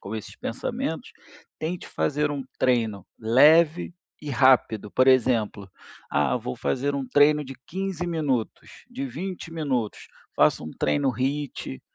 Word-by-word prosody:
com 110 +3 -6
esses 105 - -8
pensamentos, - - -4 0.4
tente 170 +3 -4
fazer 150 +1 0
um 140 -2 -3 0.2
treino 115 -6 +1
leve 155 +9 +4 0.3
e 150 -1 -6
rápido. 120 -5 +3
Por 130 +1 +3
exemplo: 115 -6 +2 0.4
ah, 70 -3 +2
vou 65 - -5
fazer 140 +2 -1
um 135 -2 -3
treino 145 +3 +4
de 135 0 -8
15 190 -1 -3
minutos, 150 -9 -3
de 135 - -4
20 165 +5 -6
minutos, 135 -9 -2 0.3
faço - - +3
um 80 - -6
treino 145 -2 +1
HIT. 135 - -3
135 Hz, 135 wpm, -25 LUFS, 115-150 Hz, 0.4 s, leve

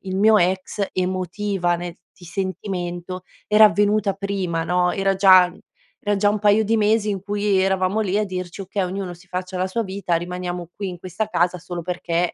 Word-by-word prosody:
il 190 0 -4
mio 215 +2 +5
ex 185 +2 0
emotiva, 185 0 -1
nel 175 0 -6 0.2
ti 175 - -15
sentimento, 185 0 -4 0.2
era 210 +1 +7
avvenuta 205 -1 +3
prima, 190 -4 -2
no, 180 0 +1
era 195 0 +1
già 185 -2 +7 0.5
era 205 0 +1
già 205 +1 +3
un 210 0 0
paio 210 +1 +4
di 225 +2 +2
mesi 215 0 +2
in 195 -2 -3
cui 205 -1 +1
eravamo 190 +2 +1
lì 205 -1 0
a 215 - +1
dirci: 185 0 -6
"Okay, 195 +1 -2
ognuno 185 -1 -4
si 180 +2 -19
faccia 185 +1 -4
la 185 +1 0
sua 230 +4 -1
vita, 190 -3 -1
rimaniamo 175 0 -5
qui 200 -2 -4
in 175 -1 -7
questa 190 +5 -4
casa 180 -1 +1
solo 175 +1 -6
perché 175 0 -1
185 Hz, 190 wpm, -22 LUFS, 180-205 Hz, 0.5 s, era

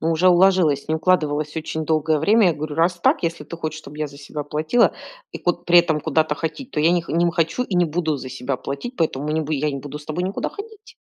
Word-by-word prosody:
Ну, 165 - 0
уже 165 +3 +3
уложилось, 175 -6 +4
не 160 - +1
укладывалось 155 -3 0
очень 160 0 -3
долгое 155 0 +1
время. 205 +5 +4
Я - - +2
говорю: 150 0 -5
"Раз 165 +3 +2
так, - - +2
если 165 0 -2
ты 170 - -8
хочешь, 155 -1 -4
чтобы 150 0 -12
я 155 - -1
за 140 0 -14
себя 145 +1 -6
платила 155 +11 +2 0.4
и - - -6
куд 175 -1 -1
при 175 0 +7
этом 160 -3 +2
куда-то 155 0 +1
ходить. 170 - -5
То - - 0
я 160 +3 +4
не 175 -1 +1
не 170 +1 +2
хочу 165 +7 0
и 205 -7 -3
не 175 - +4
буду 160 -1 -1
за 130 0 -7
себя 130 +1 -3
платить, 140 - -6
поэтому 150 -3 -1
я 155 - 0
не 160 - +1
бу 155 0 -4
я 150 +1 0
не 140 - -4
буду 145 +2 -7
с 150 - -14
тобой 160 +4 -3
никуда 190 +2 -2
ходить". 435 +1 -11
160 Hz, 260 wpm, -22 LUFS, 150-175 Hz, 0.4 s, при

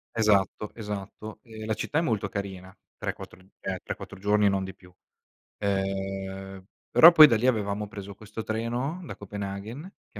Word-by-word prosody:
Esatto, 105 -1 +2
esatto. 105 0 -6
Ehm, 110 -2 -9
la 110 - 0
città 150 - -1
è - - +2
molto 110 -10 0
carina, 95 -2 -6 0.2
tre, - - -3
quattro - - -11
uhm, 95 +1 -22
3-4 95 -1 -5
giorni 105 +1 +3
e - - +5
non 95 -1 0
di 95 0 -6
più. 90 -1 -19 0.7
Uhm, 95 -1 -3 0.3
però 170 +2 +9
poi 155 -2 +10
da 115 - +3
lì 120 +4 +1
avevamo 105 -3 0
preso 100 -1 -8
questo 110 +2 -7
treno, 120 +10 -2
da - - -7
Copenaghen, 100 +4 -6 0.3
che - - -10
105 Hz, 170 wpm, -27 LUFS, 95-110 Hz, 0.7 s, poi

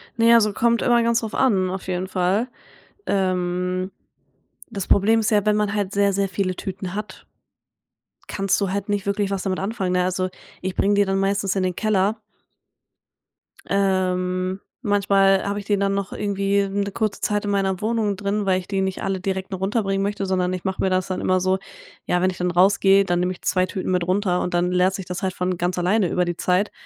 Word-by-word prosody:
Ne, 230 0 +5
also 215 -3 +4
kommt 235 +2 +2
immer 240 -1 +3
ganz 230 0 +2
drauf 225 -2 -5
an 195 -8 +2
auf 185 0 -5
jeden 185 0 -2
Fall. 185 +5 0 0.6
Ähm, 185 -1 -1 0.8
das 200 -5 -5
Problem 220 +3 +4
ist 215 - 0
ja, 205 -1 +3
wenn 210 0 +3
man 210 -1 0
halt 200 -2 -2
sehr, 200 0 +2
sehr 200 0 +1
viele 185 0 -1
Tüten 190 -1 -5
hat 210 +1 -7 1.0
kannst 195 -1 0
du 195 - 0
halt 200 +1 -3
nicht 205 -1 -1
wirklich 200 0 -1
was 195 -1 -2
damit 185 -2 -1
anfangen, 195 -2 -2
ne? 180 0 +2
Also, 185 0 -1 0.3
ich 185 0 -3
bringe 205 +1 +2
die 205 0 +4
dann 195 0 0
meistens 195 0 0
in 190 - 0
den 185 -1 -1
Keller. 210 0 +1 1.5
Ähm, 185 -1 0 0.2
manchmal 200 -3 +3
habe 200 +1 -2
ich 200 - -9
den 205 -1 +1
dann 195 0 +1
noch 195 -1 -3
irgendwie 200 0 0
‘ne 200 +1 -1
kurze 215 -1 -2
Zeit 205 -1 0
in 205 - -2
meiner 195 -1 0
Wohnung 215 -2 0
drin, 200 +1 -2
weil 185 -1 +2
ich 185 - -10
die 195 -1 -1
nicht 190 -1 -2
alle 195 -1 -1
direkt 190 +1 -3
runterbringen 195 +1 -1
möchte, 200 0 -2
sondern 185 -1 0
ich 185 - -5
mache 190 -1 -2
mir 190 - +2
das 185 0 0
dann 185 - -3
immer 185 0 +2
so 185 +1 +2 0.5
ja, 180 - +1
wenn 185 - +3
ich 185 - -6
dann 180 0 -1
rausgehe, 195 +2 +4
dann 175 -1 0
nehme 180 +1 0
ich - - -16
2 185 -1 +1
Tüten 185 0 -4
mit 180 -2 0
runter 185 -1 +1
und 180 - -3
dann 175 +1 +1
leert 180 +1 +2
sich 190 - -6
das 180 0 -5
halt 185 - -1
von 180 0 -2
ganz 175 +1 -1
alleine 185 +3 +2
über 180 - +1
die 175 -1 -3
Zeit. 185 +3 +1
195 Hz, 215 wpm, -22 LUFS, 185-205 Hz, 1.5 s, Ne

